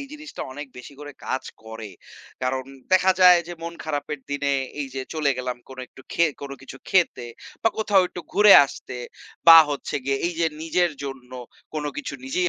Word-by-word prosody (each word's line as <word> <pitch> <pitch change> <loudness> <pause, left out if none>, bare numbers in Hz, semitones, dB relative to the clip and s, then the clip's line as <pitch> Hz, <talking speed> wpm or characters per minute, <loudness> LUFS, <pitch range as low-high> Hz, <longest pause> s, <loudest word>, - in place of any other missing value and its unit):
এই 275 - -7
জিনিসটা 300 0 -8
অনেক 145 +1 -7
বেশি 125 - -11
করে 145 -1 -9
কাজ 130 - -2 0.2
করে। 110 -1 -8 0.5
কারণ 130 +1 -1 0.3
দেখা 185 0 +5
যায় 180 -1 +8
যে - - -5
মন 170 0 -5
খারাপের 150 -1 -3
দিনে, 140 0 -1 0.3
এই 140 - -2
যে 135 - -3
চলে 150 -3 +1
গেলাম 125 -1 -3
কোনো 130 -1 -9
একটু 130 - -17
খে 170 - +3 0.2
কোনো 140 -1 -6
কিছু 135 - -10
খেতে 175 -9 +1 0.4
বা 225 - +4
কোথাও 205 -3 +4
একটু 180 - -8
ঘুরে 210 0 +7
আসতে, 125 - -9 0.5
বা 165 0 +12
হচ্ছে 140 - -4
গিয়ে 135 0 0
এই 175 - -2
যে 165 - +3 0.2
নিজের 175 +1 +1
জন্য 130 -2 -8 0.4
কোন 150 -1 -3
কিছু 145 - -5
নিজেই 175 +7 0
145 Hz, 185 wpm, -23 LUFS, 135-180 Hz, 0.5 s, বা